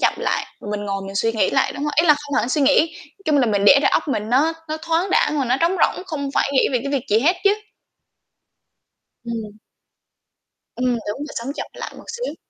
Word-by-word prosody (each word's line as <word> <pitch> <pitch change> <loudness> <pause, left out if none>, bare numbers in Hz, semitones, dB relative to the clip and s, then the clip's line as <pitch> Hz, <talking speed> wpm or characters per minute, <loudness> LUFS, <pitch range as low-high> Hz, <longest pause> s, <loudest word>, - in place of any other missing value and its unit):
chậm - - +3
lại, - - -1 0.3
mình 205 0 -3
ngồi 195 0 -3
mình 195 - -8
suy 225 +2 +1
nghĩ 220 - +1
lại 270 -1 +1
đúng 285 - -6
rồi, 300 - -1
ý 340 - +1
là 300 - +7
không 290 -1 -6
hẳn 240 - +1
suy 295 - 0
nghĩ, 280 +1 +5 0.3
nói 290 - -23
chung 300 -5 +2
là 250 - +3
mình 205 -2 +1
để 275 +6 +8
đầu 275 - +3
óc - - +1
mình 215 -5 -2
nó 290 +6 +3 0.2
nó 310 - -2
thoáng 335 +3 0
đãng 300 -4 +2
và 270 - +1
nó 250 +1 +1
trống 345 +3 +2
rỗng 370 - +1
không 285 -6 -4
phải - - +1
nghĩ 265 - +3
về 250 - +2
cái 280 - -4
việc 275 -3 -1
gì 210 - +5
hết 345 +7 +3
chứ. 400 - +5 1.7
Ừm. 220 -3 -6 1.2
Ừm, 250 - -2 0.2
đúng 210 - -3
rồi 295 +1 -7
sống 240 +4 -3
chậm - - -4
lại - - -7
một - - -12
xíu. - - -4
275 Hz, 240 wpm, -21 LUFS, 230-305 Hz, 1.7 s, để